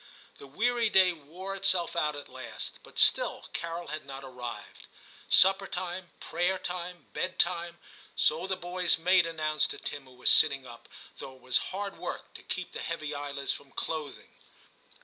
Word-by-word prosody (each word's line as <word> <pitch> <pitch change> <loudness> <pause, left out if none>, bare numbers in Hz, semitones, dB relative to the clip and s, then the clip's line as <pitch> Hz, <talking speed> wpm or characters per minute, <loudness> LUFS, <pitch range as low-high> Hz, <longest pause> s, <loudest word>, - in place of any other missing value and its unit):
The 140 - -10
weary 230 - +2
day 185 -2 +6
wore 170 +5 -7
itself 185 -3 +2
out 150 -3 +1
at 145 - -7
last, 130 -1 -7
but - - -15
still - - +4
Carol 170 0 -3
had 155 +1 -4
not 135 0 -8
arrived. 120 -4 -7 0.4
Supper 195 +1 +6
time, 180 -1 -4
prayer 175 +3 0
time, 180 -1 -5
bed 185 0 -2
time, 170 -1 +1 0.4
so 165 +4 +2
the 190 -1 -1
boys' 180 0 +1
maid 180 +1 +5
announced 155 -2 0
to - - -5
Tim 145 -2 -6
who 130 -1 -16
was 125 - +4
sitting 135 -3 +5
up, 120 -1 -12 0.3
though 130 - -8
it 130 - -20
was 130 0 +2
hard 200 +1 -4
work - - -5
to - - -10
keep 185 -1 -4
the - - -6
heavy 155 -2 -3
eyelids 145 -1 -2
from 140 - -10
closing. 155 -3 -4
165 Hz, 170 wpm, -30 LUFS, 140-185 Hz, 0.4 s, day